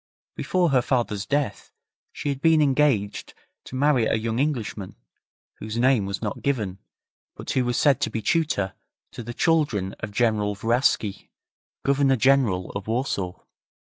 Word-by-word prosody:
Before 180 -2 +1
her 130 -3 +3
father's 120 -6 -1
death 140 -7 -2 0.4
she 145 - -4
had 140 -1 -3
been 160 -1 +5
engaged 135 -8 +1 0.3
to - - -9
marry 135 -3 +3
a - - +1
young 110 +1 -2
Englishman, 120 -9 -2 0.6
whose 110 +1 -5
name 120 -4 +3
was 100 +3 -4
not 105 -1 -4
given, 105 -9 -2 0.6
but - - -6
who 130 - +1
was 120 0 0
said 140 -3 +3
to - - +1
be 115 - -3
tutor 110 - 0 0.4
to - - -8
the 120 +1 -7
children 145 - +1
of 110 - -5
General 105 -2 +1
Vraski, 115 -2 0 0.6
Governor 140 -1 +3
General 125 -8 +2
of 100 0 -6
Warsaw. 110 -6 -2
120 Hz, 150 wpm, -24 LUFS, 105-140 Hz, 0.6 s, been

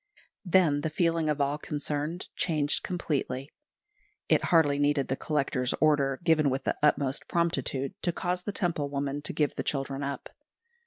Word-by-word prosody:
Then 175 -6 +3
the 160 - -1
feeling 165 0 +1
of 150 -1 0
all 140 +1 0
concerned 150 +3 -3
changed 150 -4 +1
completely. 145 -6 -3 0.8
It - - +3
hardly 145 -4 +4
needed 145 -1 +1
the 130 - +1
Collector's 135 -4 0
order, 140 -3 +3
given 160 -4 +4
with 135 +1 -2
the - - 0
utmost 140 -2 +1
promptitude, 140 -5 -1
to 175 - +1
cause 180 +1 -2
the 205 - -4
Temple 170 -7 -1
woman 140 0 -2
to - - -4
give 150 -2 0
the - - -1
children 135 -1 -2
up. 140 -1 -4
145 Hz, 160 wpm, -28 LUFS, 140-165 Hz, 0.8 s, hardly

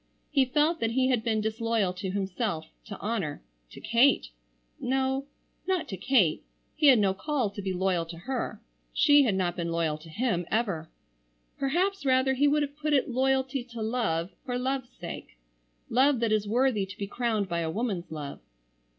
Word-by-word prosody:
He 275 -3 +4
felt 300 +6 +2
that 225 - +1
he 260 +1 +2
had 245 -4 +1
been 220 -2 +1
disloyal 220 -3 0
to 190 +1 -4
himself, 190 -2 -2 0.2
to - - -7
honor,—to - - -5
Kate—no—not 265 - -1
to 195 - -4
Kate, 190 - +2 0.3
he 305 -1 +3
had 265 -3 +8
no 200 -3 +3
call 260 -1 -1
to 200 - -6
be 190 -1 -2
loyal 180 -2 0
to 165 0 -8
her. 225 +1 -4 0.3
She 290 -1 +6
had 210 -5 +1
not 180 -2 0
been 170 -1 -3
loyal 165 -2 0
to 160 +1 -13
him 180 -2 -1
ever. 195 -9 -1 0.7
Perhaps 365 +8 0
rather 260 0 +3
he 280 +3 +3
would 295 +1 +3
have 285 0 -5
put 305 0 -1
it 265 -2 +2
loyalty 265 +1 +1
to 235 -2 -7
Love 215 -7 -1
for 245 -2 -2
Love's 260 0 -2
sake, - - -9 0.5
love 265 +2 +3
that 230 -2 +1
is 215 -1 +1
worthy 230 -3 +2
to 190 - -10
be 200 - -3
crowned 215 -1 -1
by 170 -1 -1
a 165 -1 -1
woman's 195 -3 -3
love. 150 -3 -6
225 Hz, 175 wpm, -28 LUFS, 180-265 Hz, 0.7 s, had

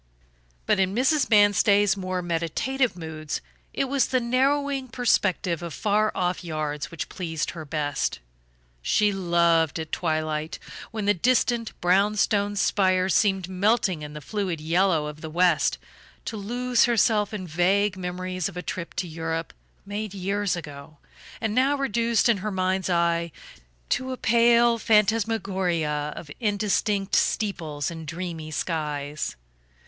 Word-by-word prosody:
But - - +2
in 190 +1 +1
Mrs. 265 +3 +2
Manstey's 205 -1 +5
more 185 -2 -3
meditative 175 - -1
moods 155 -2 -5 0.3
it - - -1
was 270 -1 +1
the 255 - +1
narrowing 270 +2 +1
perspective 190 -8 +1
of 170 -3 -6
far 215 0 +1
off 180 -1 -1
yards 155 -3 -3
which 165 - -5
pleased 160 -4 -3
her 160 -3 -8
best. 145 - -2 0.6
She 210 - +2
loved, 170 -4 +2
at 160 -1 -6
twilight, 155 -1 -2 0.3
when 215 -2 -4
the 205 - +4
distant 235 +3 +1
brown 195 +4 +3
stone 205 0 +1
spire 190 -1 +2
seemed 190 0 +2
melting 190 -2 +1
in 150 0 -7
the 150 - -7
fluid 195 -6 -2
yellow 165 0 +2
of 150 0 -7
the 160 - -6
west, 175 0 +2 0.5
to 225 - -4
lose 240 +4 +1
herself 220 -3 +2
in 205 -4 -5
vague 185 +4 +2
memories 185 -1 -3
of 180 - -11
a 180 - -4
trip 170 -2 -5
to 180 - -2
Europe, 165 0 -4 0.3
made 205 0 -5
years 200 +1 -1
ago, 150 -2 -9 0.4
and 220 -2 -1
now 265 +5 +3
reduced 235 -4 +1
in 235 -3 +3
her 205 +3 -3
mind's 190 -1 -1
eye 170 -1 +1 0.6
to 260 0 -1
a 255 - -4
pale 235 +1 +4
phantasmagoria 195 -9 +1
of 145 - -9
indistinct 205 -2 0
steeples 160 -9 -1
and 160 -2 -8
dreamy 165 -1 -5
skies. 150 - -3
185 Hz, 140 wpm, -25 LUFS, 165-215 Hz, 0.6 s, Manstey's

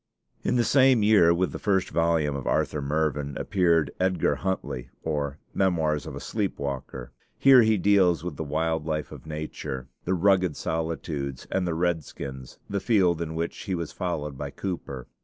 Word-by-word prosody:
In 125 - +1
the 120 - +3
same 130 -3 +5
year 105 -6 +6
with 90 +2 +1
the - - -6
first 95 -3 +1
volume 80 -3 +1
of 70 - -5
'Arthur 75 - 0
Mervyn' 75 -1 -1
appeared 85 -6 +2
'Edgar 90 -2 +1
Huntly: 85 -9 -3
or 75 -2 -2 0.2
Memoirs 80 -6 +1
of - - -6
a - - -5
Sleep 105 -4 -2
Walker.' 65 -2 -5 0.3
Here 135 -2 +7
he 110 -1 +3
deals 95 -4 +3
with 90 -4 -4
the 80 - -4
wild 80 +1 -1
life 75 -1 -2
of - - -11
nature, 75 -4 -5 0.2
the 95 - +1
rugged 95 -3 +3
solitudes, 80 -4 -3
and 95 -2 0
the 85 - -1
redskins, 75 -6 -3
the 100 - -2
field 95 -7 +2
in 80 -1 -4
which 85 +1 -2
he 95 -4 -3
was 85 -2 -4
followed 75 -6 -4
by - - -3
Cooper. 75 -9 -5
80 Hz, 175 wpm, -26 LUFS, 75-95 Hz, 0.3 s, Here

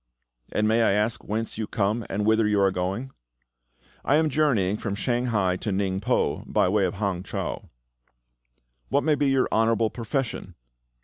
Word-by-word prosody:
"And 105 0 +1
may 110 +2 +3
I 110 - +3
ask 105 +3 0
whence 110 +1 -3
you 110 - -2
come 110 +1 -1
and 105 +1 -1
whither 110 0 +3
you 105 -1 +2
are 100 -1 +4
going?" 95 +8 -3 0.9
"I 140 - +3
am 155 0 +3
journeying 125 -10 +1
from 100 -2 -3
Shanghai 110 -6 0
to 105 - -3
Ningpo, 100 +5 -1
by - - +3
way 100 0 +2
of 90 - -2
Hang 100 -3 -2
chau." 95 - -5 1.2
"What 140 +2 +2
may 155 - +3
be 145 -1 +1
your 135 -1 +2
honourable 115 0 +2
profession?" 120 +2 -4
110 Hz, 165 wpm, -25 LUFS, 100-120 Hz, 1.2 s, are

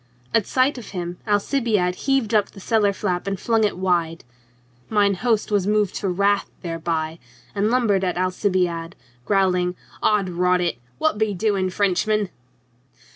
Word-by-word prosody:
At 225 -4 +2
sight 260 +1 +2
of 220 - -10
him 175 0 -4
Alcibiade 205 -3 +1
heaved 265 +1 0
up 210 -2 +3
the - - -13
cellar 210 0 +2
flap 190 -2 -2
and 195 -2 -2
flung 225 0 +1
it 210 - +2
full 180 - -10
wide. 170 -3 0 0.7
Mine 205 -2 +3
host 220 +2 0
was 200 -2 +1
moved 210 -2 +2
to 200 - -2
wrath 200 +2 +1
thereby, 165 -1 -3 0.3
and 205 +1 +1
lum 245 0 +2
bered 195 -2 +2
at 180 -1 -1
Alcibiade, 180 -2 0 0.3
growling: 180 -2 +2
" - - -23
'Od 210 -3 +2
rot 180 +1 +2
it! 170 -9 -1 0.2
What 315 -9 0
be 215 -2 +1
doing, 195 -1 0
Frenchman?" 205 +1 +1
195 Hz, 165 wpm, -22 LUFS, 180-215 Hz, 0.7 s, up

